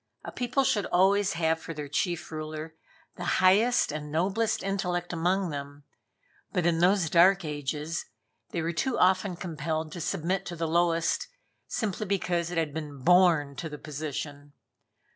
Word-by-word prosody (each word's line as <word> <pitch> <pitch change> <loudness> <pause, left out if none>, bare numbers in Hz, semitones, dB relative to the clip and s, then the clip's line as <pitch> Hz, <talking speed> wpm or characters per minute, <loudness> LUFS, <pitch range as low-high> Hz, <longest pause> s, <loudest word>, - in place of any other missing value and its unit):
A - - -6
people 255 +2 0
should 210 -6 +1
always 195 +2 +3
have 160 -1 +1
for 165 - -7
their 150 -1 -5
chief 170 +4 -2
ruler 155 0 -6 0.4
the 180 - -5
highest 205 +3 +4
and 150 0 -5
noblest 195 +8 0
intellect 180 -3 -2
among 180 +2 0
them, 145 0 -7 0.7
but 180 - 0
in 170 -1 +2
those 180 0 +3
dark 180 +3 +5
ages 150 +2 -3 0.4
they 170 - -3
were 165 +1 -1
too 245 +9 -1
often 185 0 +3
compelled 160 -2 -3
to 175 - -6
submit 180 +2 -1
to 175 - -5
the 165 0 -2
lowest, 170 - +1 0.4
simply 215 -1 -2
because 175 -3 0
it 175 - -4
had 160 -3 0
been 145 -4 -6
born 170 -5 +4
to 165 - -4
the 150 - -7
position. 145 -1 -6
170 Hz, 160 wpm, -28 LUFS, 155-185 Hz, 0.7 s, dark